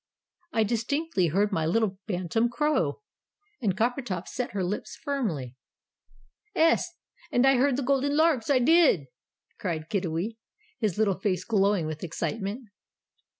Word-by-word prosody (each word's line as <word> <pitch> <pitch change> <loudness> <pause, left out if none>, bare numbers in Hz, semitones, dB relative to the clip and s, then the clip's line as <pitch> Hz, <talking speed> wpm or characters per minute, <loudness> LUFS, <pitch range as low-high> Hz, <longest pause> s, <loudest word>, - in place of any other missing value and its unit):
"I 225 - +2
distinctly 235 - 0
heard 200 +6 +1
my 165 -5 0
little 195 +1 +1
bantam 190 +4 0
crow!" 300 - 0 0.6
and 195 -5 0
Coppertop 230 -6 -1
set 250 - -4
her 195 -2 -1
lips 185 +4 -3
firmly. 185 - -3 1.0
"'Es, 330 -1 +3 0.4
and 245 - +3
I 270 -1 +5
heard 265 0 +3
the 280 - -1
Golden 280 +2 +1
Larks 315 -7 +3
I 280 - +5
did!" 280 - +4 0.5
cried 160 -4 -3
Kiddiwee, 190 +3 -2 0.4
his 210 -5 0
little 205 -4 +1
face 190 -2 0
glowing 200 -5 +2
with 155 -1 -5
excitement. 205 - -3
220 Hz, 135 wpm, -27 LUFS, 185-265 Hz, 1.0 s, I